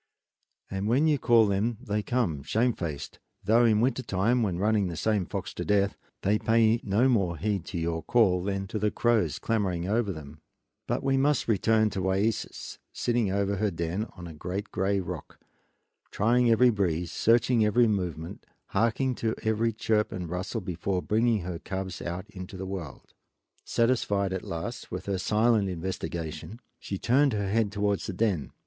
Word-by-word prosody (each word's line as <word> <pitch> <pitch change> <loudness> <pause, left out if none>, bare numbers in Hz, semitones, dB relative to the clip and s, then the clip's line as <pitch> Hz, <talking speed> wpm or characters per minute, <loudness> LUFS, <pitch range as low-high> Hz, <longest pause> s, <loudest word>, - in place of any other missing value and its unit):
And 95 +1 -2
when 130 +7 +3
you 150 -3 +3
call 115 -2 +5
them 105 +3 0
they 105 -4 -2
come 105 - -1
shamefaced; 85 - -2 0.2
though 115 +3 +4
in 110 -2 +4
winter 130 +1 +1
time, 115 +3 +1
when 95 -6 0
running 105 0 +2
the 85 -2 -5
same 105 0 0
fox 100 -2 -5
to - - -4
death, 100 -1 +2 0.3
they 105 +2 +2
pay 115 0 +3
no 105 +6 +2
more 95 -9 +1
heed 100 +1 -1
to - - -5
your 80 0 -1
call 95 -2 +3
than 100 0 -2
to 110 - -3
the 105 +1 +2
crows 120 0 +1
clamoring 95 -6 -1
over 110 0 +1
them. 75 -2 -10 0.5
But - - -1
we 135 0 +2
must 145 +1 +2
return 110 0 +3
to 95 - -3
Wayeeses, 95 +4 -1
sitting 120 -5 0
over 100 0 0
her 105 +2 +1
den 85 +5 -3
on 90 - -8
a 85 - -8
great 95 +6 -5
gray 100 +1 0
rock, 90 - -7 0.7
trying 120 +3 +2
every 120 +2 +5
breeze, 90 -5 -1
searching 115 0 +3
every 115 +3 +4
movement, 90 -6 -3 0.2
harking 120 +3 +1
to 110 -1 -1
every 110 +1 +1
chirp 105 -1 0
and 90 -2 -4
rustle 90 +6 -3
before 90 +1 -2
bringing 110 0 +2
her 85 -1 -5
cubs 95 -1 -5
out 90 +3 -5
into 95 0 -8
the 95 - -5
world. 95 -7 -7 0.5
Satisfied 105 -5 +1
at 95 - -3
last 85 +9 -5
with 95 +1 -5
her 100 -2 -1
silent 110 +1 +2
investigation 90 +2 -5 0.2
she 100 - -5
turned 135 +5 +3
her 100 -2 -1
head 110 -2 +1
towards 100 -1 -1
the 100 - -3
den. 95 -7 0
100 Hz, 175 wpm, -28 LUFS, 90-115 Hz, 0.7 s, call